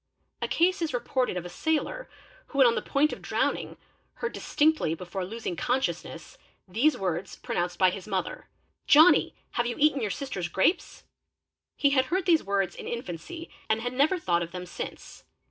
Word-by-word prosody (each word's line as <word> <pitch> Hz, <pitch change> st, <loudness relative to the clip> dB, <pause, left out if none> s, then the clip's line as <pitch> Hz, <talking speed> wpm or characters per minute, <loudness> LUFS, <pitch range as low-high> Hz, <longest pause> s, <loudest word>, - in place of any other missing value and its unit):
A -, -, 0 dB
case 365 Hz, +2 st, +2 dB
1s 320 Hz, -6 st, -1 dB
reported 250 Hz, -4 st, -1 dB
of 180 Hz, -, -4 dB
a -, -, -6 dB
sailor 320 Hz, -, -2 dB, 0.4 s
who 275 Hz, -, -8 dB
when 270 Hz, -, +7 dB
on 235 Hz, -, +5 dB
the -, -, -1 dB
point 295 Hz, +2 st, +1 dB
of -, -, -8 dB
drowning -, -, -1 dB, 0.4 s
heard 470 Hz, -, -4 dB
distinctly 300 Hz, -, +1 dB
before 180 Hz, +2 st, -5 dB
losing 215 Hz, -1 st, -4 dB
consciousness 255 Hz, +9 st, -2 dB, 0.3 s
these 240 Hz, +11 st, +2 dB
words 185 Hz, 0 st, -3 dB
pronounced 175 Hz, 0 st, -3 dB
by 185 Hz, 0 st, +5 dB
his 190 Hz, +1 st, -7 dB
mother 190 Hz, -3 st, -3 dB, 0.4 s
'Johnny! 315 Hz, +5 st, +6 dB, 0.2 s
Have 240 Hz, -, 0 dB
you 240 Hz, -, -2 dB
eaten 290 Hz, -2 st, +3 dB
your 215 Hz, -, -1 dB
sister's 195 Hz, -7 st, -3 dB
grapes?.'"' 190 Hz, -, 0 dB, 0.7 s
He 280 Hz, -, +3 dB
had 265 Hz, -2 st, +3 dB
heard 365 Hz, +6 st, -1 dB
these 335 Hz, -4 st, +4 dB
words 195 Hz, -2 st, 0 dB
in -, -, -8 dB
infancy 235 Hz, -, -6 dB, 0.2 s
and 220 Hz, -, +2 dB
had 245 Hz, +1 st, -3 dB
never 290 Hz, +8 st, +3 dB
thought 175 Hz, -, +1 dB
of 170 Hz, -, -3 dB
them 180 Hz, 0 st, -6 dB
since. 175 Hz, -, -8 dB
240 Hz, 180 wpm, -27 LUFS, 185-305 Hz, 0.7 s, when